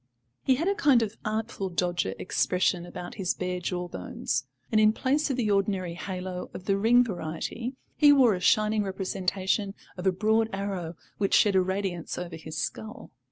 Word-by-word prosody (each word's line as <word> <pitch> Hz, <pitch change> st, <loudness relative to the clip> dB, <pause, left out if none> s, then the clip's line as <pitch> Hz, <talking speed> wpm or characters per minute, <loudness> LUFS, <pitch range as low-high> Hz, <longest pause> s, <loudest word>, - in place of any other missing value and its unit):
He 260 Hz, -, +3 dB
had 325 Hz, +7 st, -1 dB
a 400 Hz, -, +3 dB
kind 285 Hz, -, +4 dB
of 215 Hz, -1 st, -4 dB
Artful 215 Hz, -2 st, -2 dB
Dodger 175 Hz, 0 st, -1 dB
expression 180 Hz, -1 st, 0 dB
about 175 Hz, 0 st, -7 dB
his 185 Hz, -, 0 dB
bare 180 Hz, 0 st, -2 dB
jaw 180 Hz, 0 st, -3 dB
bones, 130 Hz, -, -3 dB, 0.2 s
and 215 Hz, -, +4 dB
in 215 Hz, 0 st, +5 dB
place 285 Hz, +6 st, +1 dB
of 265 Hz, -, -1 dB
the 220 Hz, -4 st, +1 dB
ordinary 195 Hz, -3 st, 0 dB
halo 180 Hz, 0 st, -5 dB
of 185 Hz, -, -8 dB
the 195 Hz, -, +2 dB
ring 230 Hz, +5 st, +5 dB
variety, 225 Hz, +5 st, -4 dB, 0.2 s
he 295 Hz, -1 st, +7 dB
wore 260 Hz, -6 st, +6 dB
a 180 Hz, -, -2 dB
shining 215 Hz, +3 st, +3 dB
representation 190 Hz, +1 st, -1 dB, 0.2 s
of 180 Hz, +1 st, -2 dB
a -, -, +5 dB
broad 220 Hz, +4 st, +2 dB
arrow 195 Hz, -4 st, -3 dB, 0.2 s
which 200 Hz, -1 st, +2 dB
shed 205 Hz, -2 st, +4 dB
a 190 Hz, -, +6 dB
radiance 190 Hz, -2 st, -2 dB
over 175 Hz, -1 st, -5 dB
his 160 Hz, -1 st, -8 dB
skull. 220 Hz, +7 st, -5 dB
195 Hz, 180 wpm, -27 LUFS, 180-220 Hz, 0.2 s, he